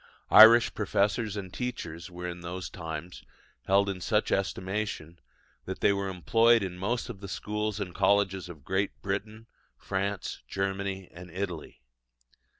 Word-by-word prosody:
Irish 115 +2 +9
professors 105 +1 0
and 95 -3 -6
teachers 85 -10 -5
were 90 0 -6
in 90 0 -6
those 85 -2 -6
times 80 +2 -7 0.5
held 100 +1 +4
in 95 -2 -3
such 105 +4 +1
estimation 95 -3 -2 0.5
that 95 - -6
they 100 - +4
were 100 -1 -2
employed 115 +5 +4
in 90 -2 -4
most 105 +7 -2
of 120 -6 -8
the 100 - -8
schools 105 +1 -3
and 95 -3 -4
colleges 95 -1 +2
of 75 -6 -11
Great 95 +2 -1
Britain, 105 +3 -4 0.3
France, 100 +1 -3
Germany, 95 -1 -3
and 90 +1 -11
Italy. 90 -6 -6
95 Hz, 145 wpm, -29 LUFS, 90-105 Hz, 0.5 s, Irish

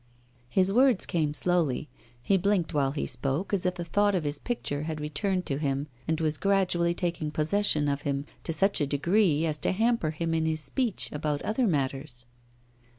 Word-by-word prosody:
His 190 +6 +2
words 255 -3 +4
came 155 -4 0
slowly; 155 -3 +1 0.4
he 200 - +3
blinked 190 -2 +1
while 140 -2 +2
he 140 +2 -3
spoke 135 - -2
as 185 -2 +1
if 180 - -1
the 175 -1 -5
thought 205 +4 +2
of 175 - 0
his 145 0 -1
picture 145 -12 -3
had 155 0 -4
returned 180 +5 -1
to 135 0 -2
him 140 -1 -1 0.2
and 160 0 0
was 155 -2 0
gradually 180 -3 +1
taking 170 -4 -2
possession 155 0 +1
of 140 0 -1
him, 140 0 -2 0.2
to - - -1
such 195 +2 +2
a 145 - +1
degree 165 +2 +2
as 155 -2 -1
to - - 0
hamper 225 -3 +1
him 165 +1 -2
in 160 0 +1
his 160 0 0
speech 235 - -1
about 150 -1 -2
other 225 +3 +1
matters. 135 -5 -2
160 Hz, 190 wpm, -28 LUFS, 145-190 Hz, 0.4 s, words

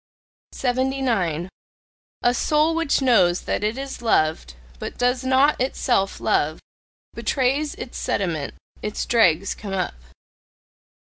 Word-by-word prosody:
79. 245 - 0 0.8
A 245 - +4
soul 305 +5 +2
which 325 -4 +1
knows 185 -9 +4
that - - -2
it 215 +4 0
is 270 -2 -6
loved, 155 - +1 0.2
but - - -6
does 250 +1 +1
not 265 +2 +3
itself 245 -6 0
love, 155 +2 +1 0.5
betrays 280 +3 0
its 250 - -7
sediment: 165 -7 -2 0.3
its 210 0 -3
dregs 195 -5 +3
come 200 -2 -7
up. 185 - -1
245 Hz, 115 wpm, -23 LUFS, 185-265 Hz, 0.8 s, A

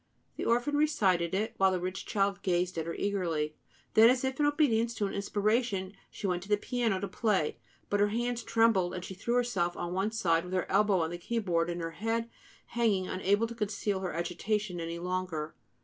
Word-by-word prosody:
The - - -4
orphan 245 +5 +2
recited 195 - +2
it, 215 +3 -1
while 190 0 +5
the 185 -1 0
rich 185 +2 -4
child 195 -2 0
gazed 180 -1 0
at 160 - -3
her 170 - -3
eagerly. 165 -7 -1 0.4
Then, 225 +1 +8
as 255 +1 +2
if 265 +1 -2
in 295 - +4
obedience 235 -6 +2
to 210 - 0
an 195 - -3
inspiration, 205 -1 0 0.2
she - - -7
went 180 -2 0
to 195 - -11
the 210 - +4
piano 230 -4 0
to 200 - -3
play; 195 -5 0 0.3
but 205 - 0
her 205 - +4
hands 240 +3 -1
trembled; 190 -7 +2
she - - -7
threw 235 +6 -2
herself 215 -8 0
on 175 0 -3
one 195 +3 0
side, 170 -7 +1
with 180 +1 -7
her 185 - +1
elbow 200 -2 +3
on 160 0 -1
the 175 - -5
keyboard 175 -5 0
and 175 0 -3
her 165 0 -3
head 225 +6 -2 0.4
hanging, 215 -6 +1
unable 200 +4 +1
to 230 - -6
conceal 205 -2 -2
her 185 -1 -3
agitation 180 +3 -2
any 165 0 -4
longer. 180 -3 -3
195 Hz, 205 wpm, -30 LUFS, 180-225 Hz, 0.4 s, Then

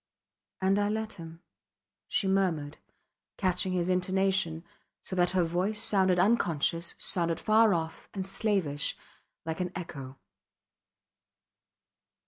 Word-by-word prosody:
And 195 +2 +3
I 205 0 +1
let 220 0 -3
him, 165 +2 -11 0.6
she 195 - 0
murmured, 170 -7 0 0.6
catching 185 0 0
his 175 -1 0
intonation, 185 -2 +1 0.4
so 185 - -4
that 175 -1 +3
her 180 - +4
voice 180 +6 -1
sounded 190 -4 +4
unconscious, 170 -4 +1
sounded 170 -2 0
far 215 -2 +4
off 160 -1 -5
and 190 -2 -4
slavish, 190 -8 0 0.5
like 160 +1 -3
an 180 -1 -2
echo. 135 -7 -7
180 Hz, 110 wpm, -29 LUFS, 165-195 Hz, 0.6 s, her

